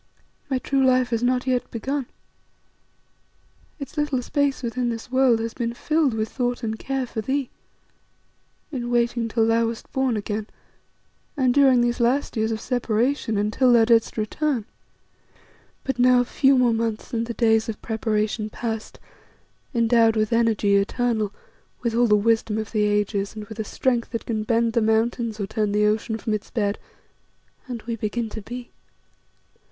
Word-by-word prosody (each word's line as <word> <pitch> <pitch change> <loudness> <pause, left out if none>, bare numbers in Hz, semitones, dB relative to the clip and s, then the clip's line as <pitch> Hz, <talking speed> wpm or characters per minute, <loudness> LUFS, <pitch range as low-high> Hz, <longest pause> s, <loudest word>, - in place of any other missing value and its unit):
My 265 - +1
true 270 +1 0
life 255 -1 +3
has 230 -1 0
not 250 +1 +1
yet 255 -2 0
begun. 265 +3 -3 1.7
Its 285 +1 -9
little 290 -4 0
space 285 -1 0
within 240 +1 -1
this 230 +1 -6
world 260 -3 +4
has 225 0 -3
been 235 -1 -3
filled 305 -3 +1
with 220 0 -1
thought 245 0 -2
and 220 -1 -3
care 270 -1 -2
for 225 -2 -4
thee; 265 +3 -2 1.2
in 245 -4 -4
waiting 235 -1 +1
till 225 0 +1
thou 230 0 +2
wast 230 0 -7
born 265 -4 0
again, 210 +1 -3 0.9
and 255 -3 +3
during 265 -3 +5
these 240 +1 0
last 255 +5 +1
years 220 0 0
of 220 - -2
separation, 240 0 0
until 215 +5 +2
thou 235 -2 +6
didst 230 -1 +2
return. 235 +2 -1 1.2
"But 270 -2 -3
now 250 0 +5
a - - -1
few 270 +2 +3
more 245 -2 +4
months, 225 0 -3
and 230 0 -1
the 235 - -5
days 225 -1 +2
of 215 - -5
preparation 215 -1 -1
past, 225 0 -5 0.7
endowed 230 -2 +3
with 215 +1 +1
energy 220 -3 +3
eternal, 215 +1 0 0.5
with 235 -2 0
all 240 +1 +3
the 210 - +5
wisdom 220 0 +1
of 220 -1 -4
the 210 -2 +1
ages, 205 0 0
and 215 -1 -6
with 220 +1 -10
a - - 0
strength 240 +2 -1
that 230 - -3
can 215 -2 -2
bend 230 0 +1
the 235 - +2
mountains 220 0 0
or 200 - -1
turn 210 0 -1
the 210 +1 +2
ocean 220 +1 0
from 220 -1 -3
its 210 - -4
bed, 205 -3 -1 0.9
and 240 -3 -6
we 230 -1 -3
begin 225 +1 -3
to 220 - -7
be. 240 +3 -8
230 Hz, 170 wpm, -23 LUFS, 220-250 Hz, 1.7 s, thou